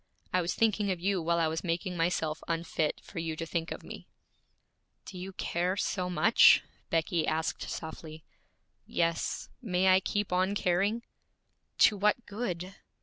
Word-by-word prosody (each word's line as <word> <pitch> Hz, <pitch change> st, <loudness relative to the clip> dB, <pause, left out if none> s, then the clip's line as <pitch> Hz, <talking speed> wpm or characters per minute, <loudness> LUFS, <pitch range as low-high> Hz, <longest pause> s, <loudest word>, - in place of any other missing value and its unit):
I 185 Hz, -, +3 dB
was 175 Hz, -, -2 dB
thinking 215 Hz, -2 st, +2 dB
of 185 Hz, -2 st, -1 dB
you 190 Hz, 0 st, 0 dB
while 170 Hz, +1 st, +1 dB
I 165 Hz, -, +3 dB
was 160 Hz, +1 st, -3 dB
making 175 Hz, +1 st, -2 dB
myself 165 Hz, -2 st, 0 dB
unfit 165 Hz, -2 st, -1 dB
for 180 Hz, -, -7 dB
you 165 Hz, -1 st, -3 dB
to 165 Hz, -, -4 dB
think 165 Hz, 0 st, -2 dB
of -, -, -6 dB
me.' -, -, -9 dB, 1.0 s
'Do 185 Hz, -, -8 dB
you 190 Hz, +2 st, -6 dB
care 180 Hz, +2 st, -1 dB
so 185 Hz, -2 st, -1 dB
much?' 215 Hz, +6 st, +6 dB, 0.3 s
Becky 165 Hz, 0 st, +1 dB
asked 160 Hz, +1 st, -1 dB
softly. 160 Hz, 0 st, -7 dB, 0.6 s
'Yes. 170 Hz, -1 st, -1 dB
May 190 Hz, -5 st, +2 dB
I 185 Hz, 0 st, +6 dB
keep 205 Hz, 0 st, -2 dB
on 185 Hz, +2 st, +2 dB
caring?' 200 Hz, +5 st, +1 dB, 0.7 s
'To 210 Hz, -, +5 dB
what 210 Hz, +4 st, +2 dB
good?' 190 Hz, -4 st, -4 dB
180 Hz, 155 wpm, -30 LUFS, 165-195 Hz, 1.0 s, much